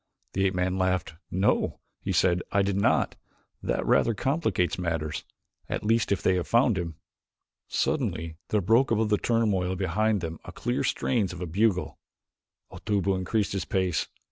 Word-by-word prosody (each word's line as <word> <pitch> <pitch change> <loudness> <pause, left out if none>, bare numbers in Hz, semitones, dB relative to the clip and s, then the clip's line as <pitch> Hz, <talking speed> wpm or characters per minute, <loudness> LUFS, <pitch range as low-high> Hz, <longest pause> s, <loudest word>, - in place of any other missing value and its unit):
The 95 0 +2
ape 95 - -2
man 90 +1 0
laughed. 95 -3 0 0.2
"No," 95 +3 +1 0.2
he - - -2
said, 90 -1 +3
"I 100 - +3
did 100 0 0
not. 100 - +2 0.4
That - - -1
rather 115 - +3
complicates 130 - 0
matters 80 -4 -2 0.5
at - - -2
least 115 0 +2
if 100 - 0
they 95 - +4
have 90 - -2
found 120 -1 +4
him." 85 -3 -3 0.7
Suddenly 80 0 -1
there 105 - +1
broke 115 +8 +4
above 110 -1 +2
the 105 - +2
turmoil 100 -6 +1
behind 100 +3 +1
them 80 -1 -5
the - - -9
clear 120 +1 -1
strains 110 -8 0
of - - -8
a 90 - -3
bugle. 95 +2 0 0.7
Otobu 100 -2 0
increased 100 +3 0
his 95 - -2
pace. 90 -4 0
95 Hz, 165 wpm, -27 LUFS, 90-110 Hz, 0.7 s, they